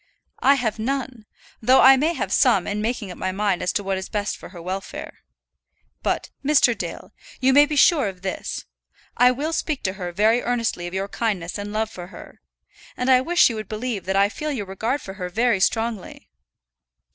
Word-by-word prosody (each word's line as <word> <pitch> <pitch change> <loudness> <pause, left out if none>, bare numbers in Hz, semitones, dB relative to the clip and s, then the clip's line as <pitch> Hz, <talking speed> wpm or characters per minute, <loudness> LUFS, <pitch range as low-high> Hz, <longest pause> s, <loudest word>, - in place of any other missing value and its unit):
"I 275 +1 +5
have 225 -5 -2
none; 255 -2 -3 0.3
though 255 +4 +5
I 270 +1 +9
may 305 +6 +1
have - - -2
some - - +4
in 205 +1 -2
making 220 -3 -3
up - - -10
my 185 - -1
mind 195 -1 0
as - - 0
to 205 - -1
what 195 -1 -1
is 190 - -7
best 210 -1 -2
for - - -12
her 180 -1 -11
welfare. 185 +3 -6 0.8
But, - - -2
Mr. 275 -4 +4
Dale, - - -7 0.3
you 260 +1 +3
may 290 +2 +7
be 300 - -3
sure 295 - +5
of 185 -1 -8
this; 190 - -4 0.5
I 250 - +6
will 290 +6 -2
speak 310 -3 -2
to 190 - -1
her 180 -3 -5
very 215 +6 +3
earnestly 230 -7 -1
of 175 - -7
your 195 +1 -2
kindness 200 -5 -3
and 205 0 -5
love 220 +1 -1
for 175 -3 -8
her. 190 - -13 0.6
And 250 +1 +1
I 255 -1 +6
wish 345 +6 +4
you 235 - -3
would 215 -3 -7
believe 215 -2 -4
that 190 +1 -1
I 200 +1 +4
feel 300 +8 -4
your 230 -8 -3
regard 220 +9 -2
for 190 - -7
her 180 - -3
very 230 +2 +1
strongly." 225 0 -2
220 Hz, 205 wpm, -23 LUFS, 195-255 Hz, 0.8 s, I